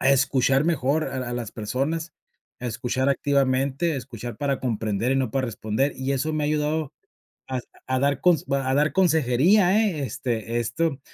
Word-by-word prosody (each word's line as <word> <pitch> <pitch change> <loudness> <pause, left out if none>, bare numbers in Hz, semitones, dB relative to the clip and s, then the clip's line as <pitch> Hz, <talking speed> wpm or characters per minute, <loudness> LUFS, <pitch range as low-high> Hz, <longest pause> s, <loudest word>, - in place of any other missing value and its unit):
a 135 - +4
escuchar 135 0 +3
mejor 155 -1 +1
a 130 - -4
la 125 -1 -4
las 120 -3 -5
personas, 145 +9 -2 0.5
a 125 - -4
escuchar 125 +3 -1
activamente, 140 +3 +1
escuchar 120 -2 -7
para 140 -2 0
comprender 115 0 -1
y - - +1
no 130 -4 0
para 130 +2 0
responder, 115 +5 -1
y 130 +1 -3
eso 145 +4 -1
me 155 -1 -1
ha - - +1
ayudado 150 0 -1 0.6
a 130 -1 -2 0.3
a 130 0 +1
dar 140 -1 +1
cons 175 -4 +3
a 135 -1 +1
dar 150 +2 +2
consejería, 180 - +4
eh, 155 -5 -4
este 115 -1 -2
esto, 145 +4 -1
135 Hz, 170 wpm, -24 LUFS, 125-150 Hz, 0.6 s, a